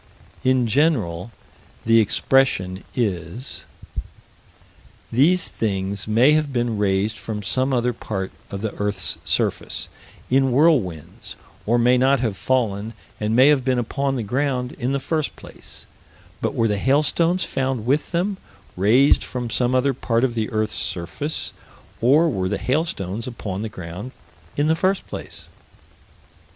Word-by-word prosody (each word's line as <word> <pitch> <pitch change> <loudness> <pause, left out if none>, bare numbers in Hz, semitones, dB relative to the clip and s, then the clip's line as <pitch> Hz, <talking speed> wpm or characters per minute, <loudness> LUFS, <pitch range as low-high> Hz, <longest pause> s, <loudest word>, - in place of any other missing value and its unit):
In 130 -1 +3
general, 115 - +1 0.6
the 115 0 +6
expression 100 -4 +2
is: 100 +1 -3 1.5
These 165 +9 +3
things 100 -2 -2
may 115 +7 +5
have 155 -2 +1
been 120 -4 -1
raised 100 +2 +1
from 105 -2 -5
some 130 +7 0
other 125 -1 +1
part 95 -4 -4 0.2
of 100 -1 -5
the 110 -1 -3
earth's 100 -3 -1
surface, - - -1 0.4
in 135 +1 +3
whirlwinds, 125 - +1 0.3
or 120 +2 +3
may 125 +1 +4
not 135 +1 +4
have 115 -5 -1
fallen, 110 -3 -1 0.2
and 110 +1 0
may 130 +4 +7
have 145 -3 +3
been 130 0 +1
upon 135 +3 -1
the 120 - -2
ground, 125 +2 -1
in 125 +1 -1
the 140 - 0
first 155 +2 -2
place - - -10 0.6
but - - -1
were 115 - +2
the 105 -2 0
hailstones 155 - +2
found 130 -4 -2
with 140 +4 +1
them, 185 +3 0 0.4
raised 115 +10 +4
from 120 -2 -4
some 125 +2 +1
other 135 +2 +2
part 115 -1 0
of 130 -3 +1
the 110 -2 -1
earth's 110 -1 -1
surface, 90 - -3 0.5
or 145 +8 +5
were 95 - -1
the - - -1
hailstones 115 - -1
upon 105 -5 -5
the 110 - -3
ground, 90 +6 -8 0.4
in 145 - +2
the 160 +1 +3
first 190 +3 0
place? - - -8
120 Hz, 145 wpm, -22 LUFS, 105-135 Hz, 1.5 s, may